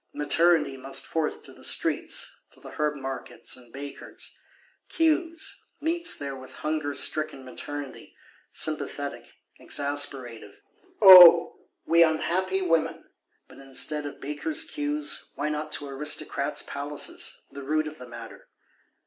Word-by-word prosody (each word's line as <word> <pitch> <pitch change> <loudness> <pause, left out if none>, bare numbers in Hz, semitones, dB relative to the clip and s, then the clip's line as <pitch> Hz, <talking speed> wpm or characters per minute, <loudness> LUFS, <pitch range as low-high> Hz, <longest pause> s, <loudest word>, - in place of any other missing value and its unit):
Maternity 150 -1 +2
must 135 +1 -2
forth 160 -2 -3
to - - -9
the - - -16
streets, - - -1
to - - -18
the - - -12
herb 150 0 -1
markets 135 -1 -6
and 120 -2 -15
Bakers'—queues; 320 - -4 0.2
meets 335 +2 +2
there 140 -1 -5
with 130 0 -12
hunger 155 -2 -2
stricken 155 -4 -1
Maternity, 145 +2 -7 0.4
sympathetic, - - -2 0.3
exasperative. 135 -7 -2 0.4
O 180 -3 +9 0.2
we 170 0 +4
unhappy 185 +4 +1
women! 165 -3 -1 0.4
But, - - -16
instead 145 +2 0
of 145 - -10
Bakers' 225 - -1
queues, 300 -1 -2
why 150 +1 -2
not 150 0 -4
to 145 - -2
Aristocrats' 140 0 -1
palaces, 145 +1 -3
the 140 - -9
root 155 +3 0
of 155 -2 -9
the 125 - -10
matter? 115 -1 -11
150 Hz, 125 wpm, -26 LUFS, 140-170 Hz, 0.4 s, O